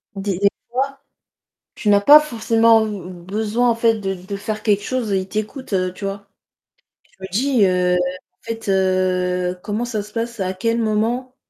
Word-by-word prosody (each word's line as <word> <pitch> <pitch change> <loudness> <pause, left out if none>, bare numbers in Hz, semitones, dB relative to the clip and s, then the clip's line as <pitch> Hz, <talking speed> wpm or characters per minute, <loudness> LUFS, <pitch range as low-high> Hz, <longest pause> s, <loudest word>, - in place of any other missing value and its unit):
des 195 -1 -2
des 200 0 +4 0.2
fois, 275 +2 -2 0.7
tu 210 - -3
n'as 205 -1 +5
pas 295 +8 +9
forcément 230 -4 +3
b 185 -4 -7
besoin, 220 +4 0
en - - +2
fait, 230 0 +2
de 195 -1 -2
de 190 +2 -7
faire 215 +1 -4
quelque 205 -2 +2
chose 235 -2 -2
et 190 - +2
il 185 - -7
t'écoute, 215 +5 -5
heu, 185 -1 0
tu 200 - -9
vois? 200 0 -5 0.8
Je - - -31
me 190 - -5
dis, 250 +1 +2
heu, 180 -1 +2
en 180 +1 -4
fait, 225 -2 -6
heu, 185 -1 +1
comment 215 +3 -2
ça 220 -3 -3
se 210 +1 -14
passe, 230 -1 -4
à 185 0 -1
quel 230 +5 -1
moment 230 +4 -1
210 Hz, 190 wpm, -20 LUFS, 190-230 Hz, 0.8 s, pas